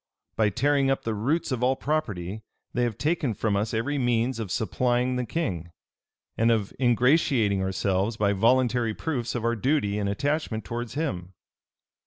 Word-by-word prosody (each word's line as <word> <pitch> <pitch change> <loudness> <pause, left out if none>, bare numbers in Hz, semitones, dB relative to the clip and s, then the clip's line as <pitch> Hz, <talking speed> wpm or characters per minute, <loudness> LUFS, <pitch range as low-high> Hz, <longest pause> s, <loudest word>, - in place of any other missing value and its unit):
By 110 -2 +3
tearing 140 +5 +2
up 135 - 0
the 115 - -1
roots 140 +10 -1
of 125 -2 -1
all 130 +2 +3
property, 110 - -2 0.3
they 125 - 0
have 115 -4 -3
taken 150 -6 0
from 105 +1 0
us 105 +2 0
every 130 +6 -1
means 120 0 +1
of 110 -4 -4
supplying 125 +3 0
the 125 -1 -2
king, 95 - -2 0.7
and 115 +1 +2
of 110 -4 +1
ingratiating 120 -4 +3
ourselves 95 +3 0
by 100 -2 +2
voluntary 120 +1 +2
proofs 125 -7 -3
of 120 -1 -2
our 115 0 +2
duty 110 -4 0
and 100 -1 -1
attachment 120 -1 -1
towards 120 +6 -5
him. 95 - -3
115 Hz, 165 wpm, -26 LUFS, 105-130 Hz, 0.7 s, By